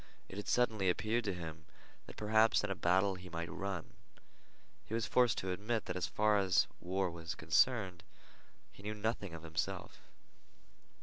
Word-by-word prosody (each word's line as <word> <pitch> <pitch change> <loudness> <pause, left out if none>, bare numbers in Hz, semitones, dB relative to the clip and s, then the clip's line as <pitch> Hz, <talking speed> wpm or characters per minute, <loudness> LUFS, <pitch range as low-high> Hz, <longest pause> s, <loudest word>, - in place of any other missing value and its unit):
It 95 - -9
had 105 - -5
suddenly 110 -6 +2
appeared 110 +6 +1
to 100 - 0
him 80 -2 -7 0.4
that - - -10
perhaps 110 +1 +4
in 105 - -1
a - - 0
battle 95 +3 +3
he 90 -1 -9
might 85 0 -4
run. 95 -4 -4 0.9
He 110 - -4
was 115 -1 0
forced 125 -3 +3
to 95 - -2
admit 105 +4 -1
that 90 - -3
as 90 -1 -1
far 105 -1 +3
as 95 -2 +4
war 95 0 -1
was 85 -1 -5
concerned 90 +2 +2 0.7
he - - -15
knew 105 +1 -4
nothing 105 -4 -2
of 80 - -9
himself. 80 -1 -3
95 Hz, 170 wpm, -35 LUFS, 90-110 Hz, 0.9 s, perhaps